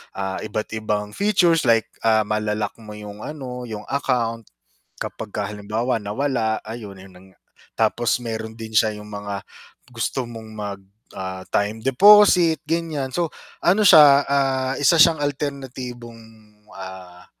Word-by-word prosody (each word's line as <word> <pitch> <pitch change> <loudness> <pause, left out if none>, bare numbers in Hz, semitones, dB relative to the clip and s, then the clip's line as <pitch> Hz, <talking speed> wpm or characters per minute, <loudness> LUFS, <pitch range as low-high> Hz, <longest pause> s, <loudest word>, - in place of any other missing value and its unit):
ah, 95 -1 -3
iba't 110 0 -4
ibang 105 -2 -2
features 175 - +2
like, 115 -1 +3 0.2
ah, 110 -1 +4
mala-lock 105 0 -2
mo 105 -1 -10
yung 105 0 -9
ano, 125 -5 -7
yung 105 -1 -6
account, 115 -5 -1 0.6
kapagka 105 -1 -5
halimbawa 110 +4 -2
nawala 110 0 -1
ayun, 110 -2 -8
ayun 95 0 -14
nanga. 95 0 -20 0.4
Tapos 120 +2 +1
mayro'n 110 -1 -5
din 110 -1 -8
siya 110 0 +2
yung 105 0 -11
mga 100 -1 -5 0.5
gusto 120 +2 -2
mong 115 -2 -9
mag, 100 -2 -5 0.3
ah, 95 0 -6
time 105 +2 -1
deposit 180 - +6
gan'yan. 160 -5 -2
So 170 +5 0 0.4
ano 195 +5 +3
siya, 145 -7 +8
ah, 135 -1 +1
isa 155 +3 +6
siyang 160 - +4
alternatibong, 130 -5 -5 0.5
ah, 95 -2 -10
115 Hz, 135 wpm, -22 LUFS, 105-135 Hz, 0.6 s, siya